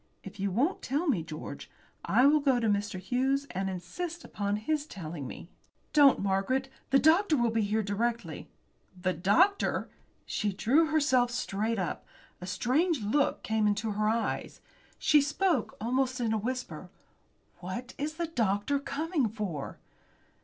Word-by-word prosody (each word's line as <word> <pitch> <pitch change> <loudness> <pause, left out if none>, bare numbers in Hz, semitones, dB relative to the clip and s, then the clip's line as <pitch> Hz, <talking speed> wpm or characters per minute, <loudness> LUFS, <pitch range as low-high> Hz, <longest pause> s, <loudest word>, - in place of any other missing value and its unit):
If 195 +1 -10
you 200 +1 0
won't 260 - 0
tell 290 +7 -1
me, 225 - +2
George, 155 -1 -8 0.3
I 250 - +4
will 300 +2 +6
go 270 -4 +2
to 230 - 0
Mr. 205 -2 0
Hughes 260 +8 0
and 190 +1 -2
insist 320 - -5
upon 205 0 -2
his 295 +8 -1
telling 160 - -6
me." - - -9 0.5
"Don't, 285 -3 +7
Margaret. 200 +8 0 0.2
The 270 - +5
doctor 320 +3 +4
will 240 -2 +2
be 225 0 +1
here 215 +1 0
directly." 230 +4 -2 0.5
"The 185 0 0
doctor?" 330 - +2 0.4
She 205 -2 -1
drew 280 - +3
herself 280 -6 +3
straight 225 -2 -2
up. 185 -3 -3 0.4
A 180 - -6
strange 265 - +1
look 275 +8 +1
came 220 -1 +1
into 210 +1 0
her 210 +1 +1
eyes. 230 +1 -2 0.4
She 300 -2 +4
spoke 300 - 0
almost 255 +3 0
in 230 -2 0
a - - +2
whisper. 250 +4 -4 0.7
"What 190 +8 -6
is 305 +2 -2
the 340 +1 -2
doctor 235 -2 0
coming 285 -2 -1
for?" 195 -10 -5
235 Hz, 155 wpm, -29 LUFS, 200-285 Hz, 0.7 s, Don't